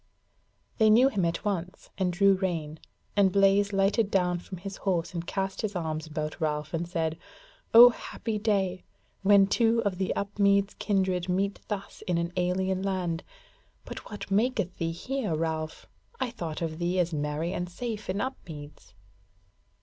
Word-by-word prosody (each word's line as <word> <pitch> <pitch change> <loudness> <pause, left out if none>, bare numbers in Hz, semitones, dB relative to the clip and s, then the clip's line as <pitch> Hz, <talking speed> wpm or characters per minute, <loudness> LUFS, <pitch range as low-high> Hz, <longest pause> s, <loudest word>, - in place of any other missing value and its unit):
They 220 -1 +6
knew 245 +5 +6
him 205 -8 -1
at 170 +4 -2
once, 185 -3 -3
and 185 -2 0
drew 195 +2 +4
rein, 165 -5 -2 0.4
and 200 -2 +4
Blaise 200 +1 +4
lighted 195 +2 +2
down 180 -3 +1
from 185 +2 -9
his 195 +2 -7
horse 180 -4 -1
and 170 -1 -4
cast 195 -1 -2
his 210 -2 -3
arms 160 -2 -3
about 155 +1 -4
Ralph, 150 0 -1
and 170 +1 -2
said: 165 -2 -2 0.5
"O 240 +2 +10
happy 225 -2 -5
day! 195 -4 0 0.4
when 200 0 +6
two 230 +3 +2
of 190 -2 -1
the 190 - 0
Upmeads 200 0 +2
kindred 185 -3 0
meet 195 +2 0
thus 200 -2 -5
in 175 -2 +1
an 170 +1 -2
alien 185 +1 0
land! 185 -4 -2 0.6
But - - -8
what 205 -1 -8
maketh 210 -3 +1
thee 165 0 0
here, 215 +1 -2
Ralph? 160 0 -3 0.3
I 245 - -1
thought 170 -7 -5
of 160 0 -4
thee 175 +2 0
as 175 -2 +1
merry 150 +3 -2
and 175 0 -3
safe 215 +2 -5
in 190 +2 -1
Upmeads?" 155 - -7
185 Hz, 165 wpm, -28 LUFS, 170-200 Hz, 0.6 s, O